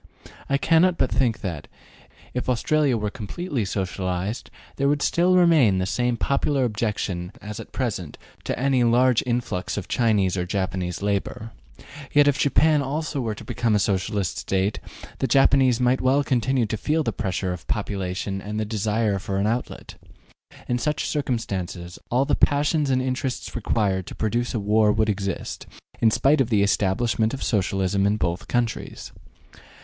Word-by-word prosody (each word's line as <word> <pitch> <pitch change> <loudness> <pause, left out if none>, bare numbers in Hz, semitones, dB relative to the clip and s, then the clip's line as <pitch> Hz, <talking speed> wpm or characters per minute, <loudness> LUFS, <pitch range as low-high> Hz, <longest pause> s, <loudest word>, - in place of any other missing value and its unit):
I 140 - +3
cannot 170 +4 +3
but - - +1
think 120 -4 +1
that, 85 -7 -5 0.7
if 125 +1 -3
Australia 135 +1 +2
were 105 -1 -2
completely 135 - -4
socialized, 95 +2 -3 0.3
there 140 - +1
would 145 -1 +1
still 180 +2 +3
remain 160 - +5
the 95 - 0
same 120 +4 0
popular 140 +2 +1
objection 105 -6 -2
as 105 +1 -7
at 115 - -9
present 100 - -3 0.3
to - - -2
any 130 -1 +2
large 120 +1 +4
influx 120 -7 -2
of 100 - -4
Chinese 105 -6 +2
or 90 0 -2
Japanese 95 -1 -2
labor. 105 +2 -2 0.6
Yet 145 0 +5
if 145 -1 +2
Japan 150 +2 +3
also 145 +1 -2
were 110 -3 -2
to - - -10
become 115 -3 0
a - - +5
Socialist 95 -2 -1
State, 95 +2 -1 0.4
the 130 - +1
Japanese 130 -1 +4
might 125 +1 +2
well 135 +3 +3
continue 130 -1 +1
to 110 +1 -3
feel 155 +8 0
the - - -2
pressure 95 -3 -2
of 90 - -9
population 95 -1 -3
and 105 +2 -4
the 110 - -1
desire 105 -1 0
for 95 +1 -3
an 100 - +1
outlet. 115 +3 -3 0.7
In 120 0 0
such 150 +4 -1
circumstances, 95 - -3
all 125 +3 +2
the 145 - -1
passions 145 +1 +2
and 130 -1 +2
interests 130 0 -3
required 100 -5 0
to - - -8
produce 120 +3 -1
a - - 0
war 105 +1 +3
would 110 +1 +1
exist, 100 -2 -3 0.3
in 115 - +6
spite 140 +6 +3
of 125 - 0
the 105 -4 +3
establishment 110 +4 +1
of 135 - -6
Socialism 95 -1 +1
in 105 +1 +1
both 85 -2 -2
countries. 120 -2 -2
110 Hz, 165 wpm, -24 LUFS, 100-130 Hz, 0.7 s, in